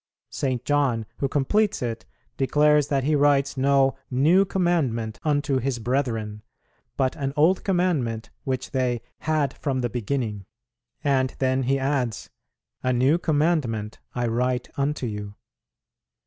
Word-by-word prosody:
St. 130 Hz, -3 st, -2 dB
John, 140 Hz, -6 st, +1 dB
who 140 Hz, -, +1 dB
completes 195 Hz, +8 st, +1 dB
it, 115 Hz, -1 st, -4 dB, 0.3 s
declares 150 Hz, +1 st, +3 dB
that 135 Hz, -2 st, 0 dB
he 155 Hz, +3 st, +1 dB
writes 140 Hz, -1 st, +3 dB
no 135 Hz, 0 st, +3 dB
"new 160 Hz, +10 st, +4 dB
commandment 150 Hz, -, 0 dB
unto 145 Hz, -3 st, +1 dB
his 130 Hz, 0 st, -1 dB
brethren," 115 Hz, -4 st, -2 dB, 0.6 s
but 130 Hz, 0 st, +1 dB
an 135 Hz, -2 st, -2 dB
old 165 Hz, +6 st, +4 dB
commandment 155 Hz, -, 0 dB
which 130 Hz, -3 st, -3 dB
they 125 Hz, -3 st, 0 dB, 0.2 s
"had 150 Hz, -3 st, 0 dB
from 135 Hz, -3 st, -2 dB
the 120 Hz, -1 st, -2 dB
beginning." 110 Hz, -4 st, -3 dB, 0.6 s
And 130 Hz, -3 st, +1 dB
then 130 Hz, 0 st, +1 dB
he 135 Hz, +2 st, +1 dB
adds, 135 Hz, -4 st, -2 dB, 0.5 s
"A 130 Hz, -, +1 dB
new 130 Hz, +7 st, +3 dB
commandment 145 Hz, -10 st, 0 dB, 0.2 s
I 120 Hz, -1 st, 0 dB
write 125 Hz, +2 st, 0 dB
unto 140 Hz, -1 st, -1 dB
you." 105 Hz, -2 st, -5 dB
135 Hz, 135 wpm, -24 LUFS, 120-145 Hz, 0.6 s, new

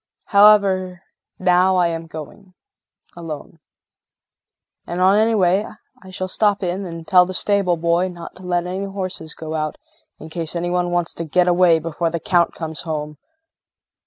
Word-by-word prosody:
However 195 Hz, -3 st, +4 dB, 0.3 s
now 185 Hz, +1 st, +3 dB
I 175 Hz, -2 st, +3 dB
am 165 Hz, 0 st, -5 dB
going 170 Hz, +5 st, -11 dB, 0.6 s
alone. 165 Hz, -2 st, -8 dB, 1.3 s
And 175 Hz, -, -4 dB
on 190 Hz, +2 st, +5 dB
my 220 Hz, +2 st, +3 dB
way 190 Hz, +1 st, +2 dB, 0.4 s
I 190 Hz, -, -12 dB
shall 185 Hz, 0 st, -4 dB
stop 205 Hz, +1 st, +1 dB
in 185 Hz, +2 st, -2 dB
and 165 Hz, -1 st, -8 dB
tell 180 Hz, -1 st, +5 dB
the 185 Hz, -, -5 dB
stable 195 Hz, -4 st, +1 dB
boy 170 Hz, +2 st, +1 dB
not 175 Hz, -2 st, -9 dB
to -, -, -14 dB
let 175 Hz, -1 st, -1 dB
any 185 Hz, +2 st, -4 dB
horses 185 Hz, -5 st, -6 dB
go 160 Hz, -1 st, -7 dB
out 155 Hz, -1 st, -3 dB, 0.4 s
in 160 Hz, -, -11 dB
case 165 Hz, 0 st, -2 dB
any 175 Hz, +1 st, -2 dB
one 180 Hz, 0 st, 0 dB
wants 175 Hz, -1 st, -1 dB
to 170 Hz, -, -5 dB
get 175 Hz, +3 st, +1 dB
away 175 Hz, -1 st, +4 dB
before 165 Hz, +1 st, -2 dB
the 170 Hz, +1 st, -3 dB
Count 170 Hz, +1 st, +1 dB
comes 160 Hz, -1 st, -5 dB
home. 150 Hz, -2 st, -5 dB
175 Hz, 165 wpm, -20 LUFS, 165-185 Hz, 1.3 s, on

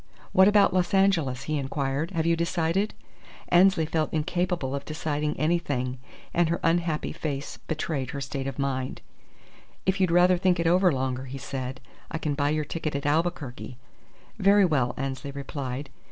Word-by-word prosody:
"What 190 Hz, +1 st, +6 dB
about 205 Hz, -2 st, +5 dB
Los 180 Hz, 0 st, +1 dB
Angeles?" 165 Hz, -10 st, +2 dB
he 155 Hz, -1 st, -1 dB
inquired. 140 Hz, +3 st, -2 dB
"Have 165 Hz, -4 st, -1 dB
you 170 Hz, 0 st, +3 dB
decided?" 170 Hz, +4 st, 0 dB, 0.5 s
Annesley 180 Hz, -1 st, +5 dB
felt 155 Hz, 0 st, -1 dB
incapable 170 Hz, -2 st, -1 dB
of 140 Hz, -, -3 dB
deciding 150 Hz, -1 st, -2 dB
anything, 140 Hz, -6 st, 0 dB, 0.3 s
and 175 Hz, -1 st, +3 dB
her 170 Hz, -, 0 dB
unhappy 165 Hz, -2 st, +1 dB
face 145 Hz, -3 st, -4 dB
betrayed 155 Hz, -4 st, -2 dB
her 140 Hz, -, -4 dB
state 135 Hz, 0 st, -4 dB
of 135 Hz, -, -5 dB
mind. 135 Hz, -2 st, -2 dB, 0.8 s
"If 190 Hz, +1 st, +1 dB
you'd 185 Hz, -, +3 dB
rather 175 Hz, +1 st, +5 dB
think 180 Hz, -1 st, +2 dB
it 170 Hz, -, 0 dB
over 180 Hz, +2 st, +4 dB
longer," 130 Hz, -1 st, -2 dB
he 135 Hz, +1 st, -7 dB
said, 130 Hz, -1 st, -5 dB, 0.3 s
"I 160 Hz, -, -3 dB
can 155 Hz, -2 st, -1 dB
buy 145 Hz, 0 st, +1 dB
your 155 Hz, 0 st, 0 dB
ticket 155 Hz, -1 st, -3 dB
at 140 Hz, -, -3 dB
Albuquerque." 145 Hz, -5 st, -1 dB, 0.6 s
"Very 200 Hz, 0 st, +5 dB
well," 130 Hz, -7 st, +1 dB
Annesley 135 Hz, +1 st, -4 dB
replied. 140 Hz, -1 st, -5 dB
155 Hz, 165 wpm, -26 LUFS, 135-175 Hz, 0.8 s, What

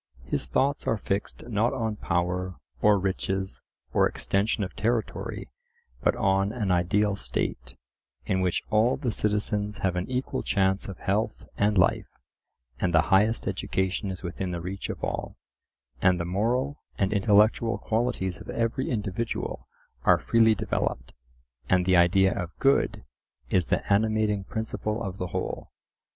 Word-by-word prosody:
His -, -, -2 dB
thoughts 135 Hz, +2 st, +1 dB
are 115 Hz, -, +2 dB
fixed 100 Hz, +3 st, -3 dB
not 115 Hz, +2 st, +1 dB
on 110 Hz, -5 st, -1 dB
power 90 Hz, 0 st, -1 dB, 0.3 s
or 105 Hz, -1 st, +5 dB
riches 95 Hz, 0 st, -2 dB, 0.3 s
or -, -, +4 dB
extension 100 Hz, +2 st, 0 dB
of 90 Hz, -, -5 dB
territory, 110 Hz, +2 st, -2 dB, 0.5 s
but -, -, +2 dB
on 95 Hz, -1 st, +2 dB
an 110 Hz, -5 st, -1 dB
ideal 100 Hz, +4 st, +2 dB
state, -, -, -3 dB, 0.5 s
in 95 Hz, 0 st, +1 dB
which 90 Hz, -1 st, 0 dB
all 110 Hz, +4 st, +3 dB
the 130 Hz, -4 st, -1 dB
citizens 105 Hz, 0 st, -1 dB
have 90 Hz, -2 st, +1 dB
an 90 Hz, +5 st, -2 dB
equal 130 Hz, +1 st, -2 dB
chance 95 Hz, -1 st, +1 dB
of 95 Hz, -2 st, -7 dB
health 105 Hz, +2 st, -1 dB
and 105 Hz, 0 st, +2 dB
life, 90 Hz, -, +3 dB, 0.7 s
and 90 Hz, -2 st, +1 dB
the 80 Hz, +5 st, +3 dB
highest 105 Hz, +4 st, +3 dB
education 95 Hz, 0 st, -1 dB
is 95 Hz, 0 st, -6 dB
within 90 Hz, +1 st, -3 dB
the 85 Hz, -1 st, -3 dB
reach 90 Hz, +3 st, -5 dB
of -, -, -6 dB
all, -, -, -3 dB, 0.6 s
and 90 Hz, -1 st, +4 dB
the 85 Hz, -, -2 dB
moral 120 Hz, -, 0 dB, 0.2 s
and 100 Hz, +1 st, +1 dB
intellectual 105 Hz, +3 st, +3 dB
qualities 110 Hz, -5 st, -1 dB
of -, -, -11 dB
every 115 Hz, +3 st, -1 dB
individual 110 Hz, 0 st, -3 dB, 0.4 s
are -, -, +6 dB
freely 115 Hz, -1 st, +4 dB
developed, -, -, -2 dB, 0.6 s
and 90 Hz, -1 st, +3 dB
"the 95 Hz, 0 st, +4 dB
idea 95 Hz, +2 st, +5 dB
of 90 Hz, -3 st, -3 dB
good" 135 Hz, 0 st, +2 dB, 0.5 s
is 90 Hz, -2 st, +3 dB
the -, -, +1 dB
animating 110 Hz, -1 st, +2 dB
principle 110 Hz, 0 st, -3 dB
of 95 Hz, 0 st, -5 dB
the 90 Hz, -, -2 dB
whole. -, -, -4 dB
100 Hz, 150 wpm, -27 LUFS, 95-110 Hz, 0.7 s, are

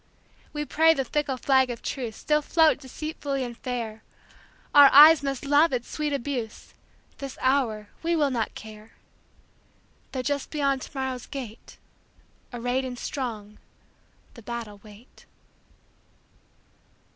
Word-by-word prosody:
We 295 Hz, 0 st, -4 dB
pray 320 Hz, +2 st, +4 dB
the 270 Hz, -, -1 dB
fickle 285 Hz, 0 st, -1 dB
flag 265 Hz, 0 st, +3 dB
of 240 Hz, -1 st, -6 dB
truceStill 275 Hz, +4 st, -2 dB
float 320 Hz, -1 st, +3 dB
deceitfully 280 Hz, 0 st, -4 dB
and 240 Hz, -1 st, -6 dB
fair; 230 Hz, -3 st, -5 dB, 0.7 s
Our 285 Hz, -1 st, +9 dB
eyes 305 Hz, +2 st, +9 dB
must 275 Hz, -1 st, -3 dB
love 290 Hz, +4 st, +4 dB
its 245 Hz, -2 st, -2 dB
sweet 300 Hz, -1 st, -2 dB
abuse; 255 Hz, -5 st, -4 dB, 0.5 s
This 275 Hz, -2 st, -7 dB
hour 240 Hz, -6 st, 0 dB
we 335 Hz, +1 st, 0 dB
will 295 Hz, -4 st, +1 dB
not 230 Hz, -4 st, -2 dB
care, 215 Hz, 0 st, -11 dB, 1.2 s
Though 260 Hz, -2 st, -3 dB
just 285 Hz, +1 st, -2 dB
beyond 275 Hz, -3 st, 0 dB
to 275 Hz, -, -10 dB
morrow's 260 Hz, -2 st, -4 dB
gate, 245 Hz, -5 st, -9 dB, 0.7 s
Arrayed 245 Hz, +2 st, -2 dB
and 250 Hz, -1 st, -6 dB
strong, 220 Hz, -6 st, -5 dB, 0.7 s
the 235 Hz, -, -13 dB
battle 225 Hz, -2 st, -7 dB
wait. 215 Hz, +3 st, -17 dB
265 Hz, 125 wpm, -26 LUFS, 235-285 Hz, 1.2 s, Our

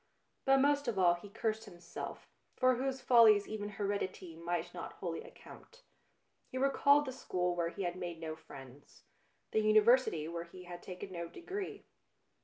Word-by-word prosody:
But 270 Hz, 0 st, +6 dB
most 285 Hz, 0 st, +3 dB
of 230 Hz, -4 st, -1 dB
all 180 Hz, -2 st, +5 dB
he 175 Hz, +4 st, -9 dB
cursed 220 Hz, +2 st, -2 dB
himself, 175 Hz, -1 st, -8 dB, 0.3 s
for 255 Hz, 0 st, +5 dB
whose 265 Hz, 0 st, -2 dB
ftfllies 225 Hz, -5 st, +7 dB
even 210 Hz, -1 st, -4 dB
heredity 195 Hz, -4 st, -3 dB
might 170 Hz, +1 st, -3 dB
not -, -, -6 dB
wholly -, -, -4 dB
account. 485 Hz, 0 st, -14 dB, 0.7 s
He 260 Hz, -, -5 dB
recalled 280 Hz, +2 st, +4 dB
the 260 Hz, -, -4 dB
school 180 Hz, -8 st, -1 dB
where 170 Hz, -1 st, 0 dB
he 195 Hz, -, -5 dB
had 175 Hz, 0 st, -2 dB
made 175 Hz, -2 st, -5 dB
no 160 Hz, -1 st, -5 dB
friends, 135 Hz, -3 st, -14 dB, 0.5 s
the -, -, +2 dB
Uni 215 Hz, 0 st, +6 dB
versity 225 Hz, -9 st, +3 dB
where 170 Hz, 0 st, -5 dB
he 180 Hz, +2 st, -12 dB
had 175 Hz, 0 st, -9 dB
taken 185 Hz, +1 st, -8 dB
no 170 Hz, -2 st, -4 dB
degree. 375 Hz, -, -6 dB
200 Hz, 170 wpm, -34 LUFS, 175-255 Hz, 0.7 s, ftfllies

